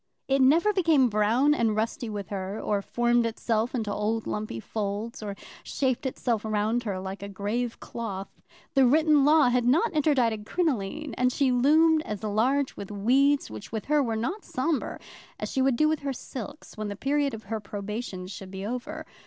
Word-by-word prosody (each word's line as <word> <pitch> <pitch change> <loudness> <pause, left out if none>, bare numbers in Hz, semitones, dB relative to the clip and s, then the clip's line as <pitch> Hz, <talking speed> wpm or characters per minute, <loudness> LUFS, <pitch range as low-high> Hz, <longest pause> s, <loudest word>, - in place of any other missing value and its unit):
It 270 0 +2
never 330 +11 +5
became 320 -9 +4
brown 225 +7 +3
and 230 -6 +1
rusty 230 +3 -2
with 205 -2 -5
her, 195 +1 -4
or 205 -1 0
formed 240 +3 +2
itself 230 +1 -1
into 215 -4 -2
old 215 +2 -1
lumpy 210 - -3
folds, 215 - -4
or 205 -2 -5 0.3
shaped 260 0 -1
itself 235 -4 -1
round 220 +2 0
her 195 -3 -2
like 190 +1 -6
a 200 - -6
grave 215 +5 -3
cloth. 200 -5 -6 0.3
The 270 -2 +5
written 305 +1 +4
law 300 -3 +6
had 245 0 +2
not 330 - +3
interdicted 255 -8 +2
crinoline, 300 - -1
and 250 0 +3
she 270 0 +2
loomed 310 +5 +4
as 210 -7 -6
large 250 +7 +1
with 200 - -7
weeds, 260 - +2
which 110 -1 -9
with 220 -2 -4
her 300 0 +3
were 230 -4 -1
not 335 - -3
sombre, 275 +3 -2 0.4
as - - -4
she 265 - 0
would 265 -1 +3
do 305 +6 +3
with 310 -1 +1
her 280 -1 -3
silks 255 +2 -8
when 215 -1 -4
the 205 - -4
period 280 +2 0
of 220 - -10
her 220 +3 -3
probation 205 -1 -5
should 190 0 -8
be 190 +1 -6
over. 275 +8 -5
240 Hz, 185 wpm, -27 LUFS, 210-280 Hz, 0.4 s, law